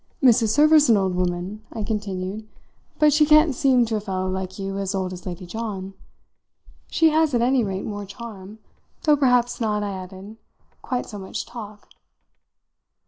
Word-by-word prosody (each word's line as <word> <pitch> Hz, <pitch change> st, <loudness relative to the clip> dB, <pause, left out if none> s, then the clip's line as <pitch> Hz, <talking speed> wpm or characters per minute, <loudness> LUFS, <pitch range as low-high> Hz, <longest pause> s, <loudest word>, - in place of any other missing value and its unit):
"Mrs. 235 Hz, -3 st, +5 dB
Server's 300 Hz, +3 st, +5 dB
an 225 Hz, -, +6 dB
old 190 Hz, -2 st, 0 dB
woman," 180 Hz, +4 st, -2 dB
I 220 Hz, -, -4 dB
continued, 205 Hz, -1 st, -4 dB, 0.5 s
"but 300 Hz, -1 st, +4 dB
she 305 Hz, +1 st, +5 dB
can't 305 Hz, 0 st, +5 dB
seem 255 Hz, -1 st, +3 dB
to 220 Hz, -1 st, -1 dB
a -, -, -1 dB
fellow 190 Hz, -2 st, -3 dB
like 185 Hz, 0 st, -4 dB
you 195 Hz, 0 st, -4 dB
as 195 Hz, 0 st, -2 dB
old 185 Hz, -1 st, -2 dB
as 180 Hz, +1 st, -9 dB
Lady 180 Hz, +1 st, -6 dB
John. 195 Hz, -1 st, -5 dB, 1.0 s
She 325 Hz, -1 st, +3 dB
has 310 Hz, -3 st, +2 dB
at 235 Hz, -, +2 dB
any 255 Hz, 0 st, +3 dB
rate 195 Hz, -2 st, -3 dB
more 205 Hz, -1 st, -5 dB
charm; 205 Hz, -1 st, -10 dB, 0.5 s
though 300 Hz, -1 st, +5 dB
perhaps 250 Hz, -4 st, +2 dB
not," 210 Hz, -2 st, 0 dB
I 205 Hz, -, -3 dB
added, 190 Hz, +3 st, -9 dB, 0.4 s
"quite 250 Hz, -2 st, -3 dB
so 210 Hz, -, -8 dB
much 190 Hz, -, -5 dB
talk." 210 Hz, -3 st, -10 dB
210 Hz, 170 wpm, -23 LUFS, 190-245 Hz, 1.0 s, an